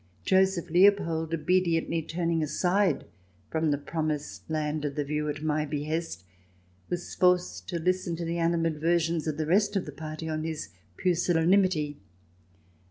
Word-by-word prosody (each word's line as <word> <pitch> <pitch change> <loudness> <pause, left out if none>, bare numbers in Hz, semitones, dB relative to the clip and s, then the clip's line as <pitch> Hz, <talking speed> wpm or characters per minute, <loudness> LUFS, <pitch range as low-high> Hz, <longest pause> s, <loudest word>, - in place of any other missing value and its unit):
Joseph 190 -3 +2
Leopold, 175 -3 +3
obediently 165 0 +1
turning 165 0 -1
aside 180 +6 +1 0.5
from 160 -1 +1
the 145 - +2
promised 155 0 -4
land 155 -1 -1
of 145 -2 -3
the 150 - 0
view 150 +1 -2
at 145 +1 -4
my 155 0 +1
behest, 150 - -3 0.7
was 175 0 -4
forced 180 - +1
to - - -2
listen 180 0 0
to 170 0 -4
the 170 +1 -2
animadversions 165 0 +1
of 155 - -2
the 155 - -1
rest 205 +5 +2
of 195 - 0
the 150 - -7
party 155 +2 -6
on 155 0 -2
his 160 -1 -4 0.3
pusillanimity. 175 -3 +2
165 Hz, 145 wpm, -28 LUFS, 155-175 Hz, 0.7 s, Leopold